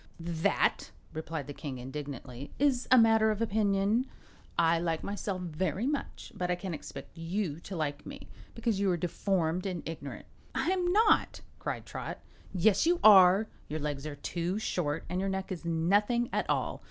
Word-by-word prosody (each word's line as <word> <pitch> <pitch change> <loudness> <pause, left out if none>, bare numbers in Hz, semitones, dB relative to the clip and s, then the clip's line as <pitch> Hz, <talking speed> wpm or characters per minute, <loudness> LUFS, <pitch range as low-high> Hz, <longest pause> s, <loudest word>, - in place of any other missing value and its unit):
"That," 165 -1 +1 0.3
replied 160 -2 -4
the 145 - -7
King, 140 -3 -6
indignantly, 135 0 -7
"is 265 -3 +2
a 255 - +7
matter 225 -1 +5
of 215 -1 -1
opinion. 215 +2 +1 0.5
I 165 0 +4
like 165 -1 -1
myself 200 -2 -3
very 175 +4 -2
much, 285 +1 -3
but 180 0 -2
I 180 - +2
can't 180 0 -5
expect 150 - -8
you 165 -1 -3
to 190 +2 -8
like 145 -3 -2
me, 280 0 -9 0.3
because 230 -3 0
you're 190 -3 +2
deformed 175 +1 0
and 180 -3 -4
ignorant." 150 -4 -7 0.3
"I'm 360 -1 +1
not!" 430 +3 +3 0.2
cried - - -4
Trot. - - -6 0.3
"Yes, 200 - +3
you 345 0 +3
are. 195 0 +8 0.2
Your 155 - -3
legs 145 -1 -3
are 150 - -5
too 170 +6 -2
short 165 -7 -2
and 180 - -2
your 195 +1 0
neck 190 0 -3
is 175 -2 -5
nothing 205 +9 +2
at - - -1
all. - - 0
180 Hz, 165 wpm, -30 LUFS, 160-215 Hz, 0.5 s, are